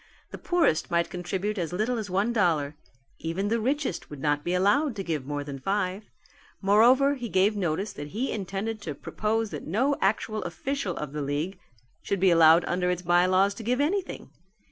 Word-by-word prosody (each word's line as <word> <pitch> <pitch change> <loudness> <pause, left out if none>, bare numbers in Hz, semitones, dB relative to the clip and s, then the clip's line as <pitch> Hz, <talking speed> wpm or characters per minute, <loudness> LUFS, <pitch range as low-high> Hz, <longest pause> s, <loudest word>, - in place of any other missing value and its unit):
The - - -8
poorest 350 - +1
might 170 0 0
contribute 190 +4 -3
as 170 -2 -2
little 220 +6 -1
as 210 -3 -5
one 200 +6 +1
dollar: 160 -9 +1 0.4
even 180 +5 -2
the 230 +1 +1
richest 260 - -2
would 150 - -9
not 145 +1 0
be 175 - -1
allowed 230 +9 +2
to 195 - -4
give 155 -7 -3
more 145 0 -3
than 140 -1 -7
five. 195 +4 -2 0.5
Moreover 240 +8 +5
he 245 -4 -5
gave 200 +3 +3
notice 190 +1 -2
that 145 0 -7
he 225 - -3
intended 205 +2 -4
to 155 -7 -5
propose 220 +7 -2
that - - -7
no 260 - +1
actual 215 +2 0
official 205 +2 -3
of 150 -2 -5
the 150 - -3
league 150 +7 -3 0.4
should 200 - -2
be 190 0 +4
allowed 165 0 +6
under 180 0 0
its 180 0 -2
by 175 +1 +4
laws 190 +2 +3
to 225 - -9
give 250 +4 0
anything. 360 +6 -2
195 Hz, 190 wpm, -27 LUFS, 170-220 Hz, 0.5 s, allowed